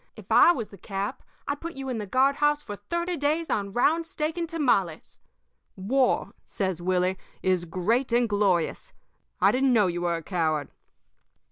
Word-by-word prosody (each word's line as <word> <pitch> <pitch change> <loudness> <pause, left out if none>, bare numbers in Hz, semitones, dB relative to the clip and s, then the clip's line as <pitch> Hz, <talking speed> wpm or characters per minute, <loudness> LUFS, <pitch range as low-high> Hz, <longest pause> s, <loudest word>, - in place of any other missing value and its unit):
If - - -13
I - - +7
was 230 -11 -3
the 200 - -14
cap, 200 +4 -4 0.3
I'd 285 0 -3
put 335 0 -6
you 270 0 -6
in 250 -4 -2
the 210 - -5
guard 265 +6 +2
house 295 0 +2
for 205 -7 -6
thirty 340 - -3
days 310 +3 0
on 200 -1 -1
round 320 +9 +2
steak 310 0 -3
and 340 -2 -3
tamales. 240 - 0 0.6
War,' 250 +7 +1
says 190 -4 -3
Willie, 185 +1 0 0.2
'is 185 -2 +1
great 215 +10 0
and 240 0 +3
glorious. 205 - 0 0.5
I - - +5
didn't 260 0 +2
know 215 -4 +4
you 175 -1 -2
were 175 -1 0
a 165 - -5
coward.' 155 -5 -1
225 Hz, 175 wpm, -26 LUFS, 185-290 Hz, 0.6 s, I